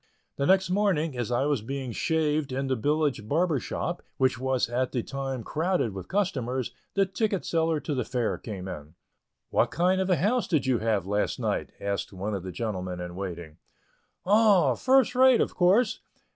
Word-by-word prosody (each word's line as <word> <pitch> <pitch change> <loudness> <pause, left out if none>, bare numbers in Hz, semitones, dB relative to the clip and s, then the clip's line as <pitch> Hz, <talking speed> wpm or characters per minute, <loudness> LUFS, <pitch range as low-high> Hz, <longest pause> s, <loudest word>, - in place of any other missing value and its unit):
The 140 - -1
next 190 -1 +3
morning, 180 -7 +1
as 120 -1 -3
I 120 +3 +1
was 145 -6 +1
being 130 +2 -4
shaved 155 0 0
in 135 +1 -2
the 135 -1 0
village 145 -2 0
barber's 160 -3 +1
shop, 90 - -3 0.2
which 130 -1 +2
was 130 -1 0
at 125 +2 -1
the 120 -3 -1
time 135 -3 -4
crowded 160 - 0
with 95 -2 -7
customers, 130 - -1 0.2
the 195 -1 +4
ticket 195 0 -1
seller 165 -1 +1
to 150 - -3
the 130 -3 0
Fair 120 -1 -2
came 95 -4 -7
in. 75 -2 -8 0.6
"What - - +3
kind 185 +2 +2
of 190 - -1
a 180 - +4
house 215 - +1
did 155 -6 +1
you 130 -3 +2
have 110 -4 0
last 105 +2 -1
night?" - - -1
asked 100 0 -3
one 100 +2 -4
of 100 - -2
the 95 +1 -6
gentlemen 95 -5 -4
in 90 0 -6
waiting. 85 -5 -6 0.7
"Oh, 205 -1 +5
first 260 -2 +3
rate, 260 -1 +6
of - - 0
course. 205 +6 +3
135 Hz, 185 wpm, -27 LUFS, 110-180 Hz, 0.7 s, rate